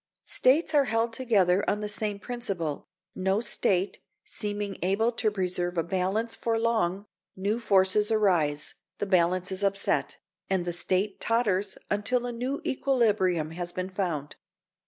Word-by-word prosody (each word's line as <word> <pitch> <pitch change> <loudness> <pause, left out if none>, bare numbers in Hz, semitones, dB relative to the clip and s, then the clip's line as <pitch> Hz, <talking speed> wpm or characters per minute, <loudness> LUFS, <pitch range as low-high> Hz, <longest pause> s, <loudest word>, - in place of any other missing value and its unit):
States 310 +5 +2
are 285 -2 +5
held 230 0 0
together 200 -7 +2
on 210 - 0
the 210 - -3
same 210 0 -2
principle, 195 - -4 0.3
no 190 +2 0
State 200 -4 0 0.3
seeming 205 -2 -4
able 200 +6 +2
to 230 -2 0
preserve 180 -3 -2
a 165 - +2
balance 190 +6 0
for 230 -1 -1
long; 220 -4 0 0.3
new 205 +4 -1
forces 205 -1 +4
arise, 175 -9 +1 0.2
the - - -2
balance 185 -1 +2
is 190 +1 -3
upset, 195 0 0 0.3
and 190 -2 0
the 175 - -2
State 190 +3 0
totters 205 -4 +1
until 240 +4 0
a 245 - -3
new 250 +4 -3
equilibrium 210 - +1
has 175 +1 -5
been 185 +1 -4
found. 170 -7 -3
200 Hz, 145 wpm, -27 LUFS, 185-225 Hz, 0.3 s, are